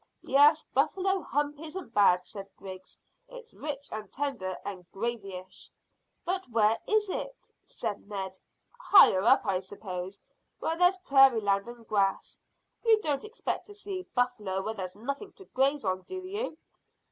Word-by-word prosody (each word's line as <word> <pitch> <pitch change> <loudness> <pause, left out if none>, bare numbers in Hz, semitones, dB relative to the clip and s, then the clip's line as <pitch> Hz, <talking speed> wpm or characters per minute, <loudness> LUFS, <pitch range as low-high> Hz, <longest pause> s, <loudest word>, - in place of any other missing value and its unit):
"Yes; 295 +3 +5
buffalo 385 0 +1
hump 290 0 -2
isn't 320 -4 -7
bad," 180 -3 +5
said 195 +1 -9
Griggs. 185 -1 -10 0.3
"It's - - -12
rich 285 -2 -5
and 215 -1 -6
tender 255 -10 -3
and 190 -3 -5
gravyish." 195 -4 -5 0.6
"But 370 -3 -2
where 225 -1 +3
is 430 -1 +2
it?" - - -6
said 205 0 -6
Ned. 190 -2 -5 0.4
"Higher 385 - +7
up, 260 +5 +5
I 190 -3 +1
suppose, 190 -1 -7 0.4
where 325 - -1
there's 360 +2 +4
prairie 270 -4 +6
land 200 +1 +1
and 240 -2 -11
grass. 195 -2 0 0.4
You 450 -2 +5
don't 290 -3 -1
expect 435 +1 -4
to 410 - -11
see 390 -2 -6
buffler 215 -7 0
where 220 - -2
there's 185 -4 -6
nothing 280 - -5
to 390 - -15
graze 270 - +1
on, 185 0 0
do 370 - -7
you? 405 -2 -4
245 Hz, 150 wpm, -29 LUFS, -, 0.6 s, Higher